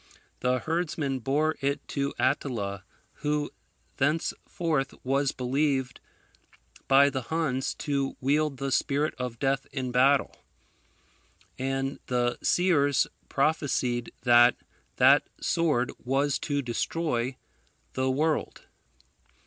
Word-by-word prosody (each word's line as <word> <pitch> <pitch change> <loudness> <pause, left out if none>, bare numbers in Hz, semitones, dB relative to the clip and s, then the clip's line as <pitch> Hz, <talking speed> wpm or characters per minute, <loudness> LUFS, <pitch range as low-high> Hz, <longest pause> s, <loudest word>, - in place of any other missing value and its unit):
The 125 0 +1
herdsman 150 -1 -2
bore 150 +6 0
it 140 +1 -1
to 140 -1 -1
Attila, 115 -8 -1 0.4
who 150 -1 -1 0.5
thenceforth 155 0 -1
was 135 +1 +1
believed 130 0 -1 0.9
by 140 +1 +6
the 130 - -2
Huns 150 -5 -1
to 140 -3 -2
wield 145 +1 +1
the 135 +1 -3
Spirit 145 +3 +1
of 125 -2 -4
Death 135 0 0
in 130 -2 -3
battle; 135 +3 +3 1.2
and 135 +1 -2
the 120 -1 0
seers 145 -7 +3 0.2
prophesied 135 -5 0
that 120 0 +6 0.4
that - - +5
sword 150 -8 +1
was 135 +2 +1
to 145 -2 -1
destroy 125 0 -2 0.6
the 130 0 0
world. 150 +4 -1
135 Hz, 100 wpm, -27 LUFS, 130-150 Hz, 1.2 s, by